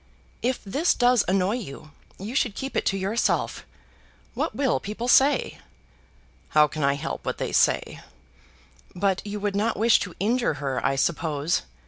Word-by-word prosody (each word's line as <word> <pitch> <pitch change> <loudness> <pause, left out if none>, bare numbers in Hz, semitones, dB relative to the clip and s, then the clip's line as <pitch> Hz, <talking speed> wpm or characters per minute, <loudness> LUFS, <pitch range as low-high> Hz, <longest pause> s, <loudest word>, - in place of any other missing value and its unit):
"If 255 +1 -1
this 285 - +1
does 245 -2 +4
annoy 195 +4 +1
you, 155 - -9 0.3
you 205 +5 -6
should 245 -6 0
keep 270 +1 -5
it - - 0
to 195 - +1
yourself! 200 +5 -1 0.7
What - - -2
will 265 -1 +1
people 215 +4 -5
say?" 270 +3 +3 1.0
"How 150 0 +7
can 150 +1 -4
I 140 0 +3
help 140 - -5
what - - -3
they - - -3
say?" - - +1 1.0
"But 190 +1 0
you 205 0 -4
would 205 -1 -2
not 220 +3 0
wish 225 +1 +4
to 180 -3 -6
injure 230 -2 +1
her, 135 -2 -3
I 135 - +1
suppose? 160 +3 0
200 Hz, 160 wpm, -25 LUFS, 165-240 Hz, 1.0 s, How